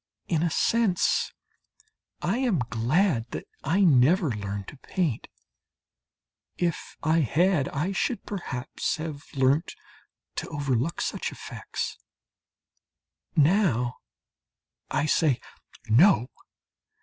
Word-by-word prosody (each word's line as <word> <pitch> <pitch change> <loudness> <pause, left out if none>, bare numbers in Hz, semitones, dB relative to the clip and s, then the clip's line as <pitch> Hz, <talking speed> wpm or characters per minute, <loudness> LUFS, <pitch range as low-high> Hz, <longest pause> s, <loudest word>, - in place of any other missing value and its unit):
In 160 -3 +1
a 170 - +2
sense 210 +2 +2 0.9
I 200 +8 +1
am 245 -8 +2
glad 120 - +1
that - - -6 0.2
I 170 +8 +2
never 160 0 +5
learnt 100 -2 -4
to - - -13
paint. 160 - -2 1.3
If 170 -3 -2
I 160 +2 +3
had 160 - +2
I 160 +7 -1
should 220 +2 -1
perhaps 140 -11 -3
have 155 -2 -6
learnt 135 +4 +2 0.6
to - - -3
overlook 145 0 -1
such - - -2
effects. - - -5 1.4
Now 145 - +3 0.9
I - - +1
say, 150 -3 +2 0.5
"No! 125 - +5
155 Hz, 100 wpm, -27 LUFS, 125-180 Hz, 1.4 s, never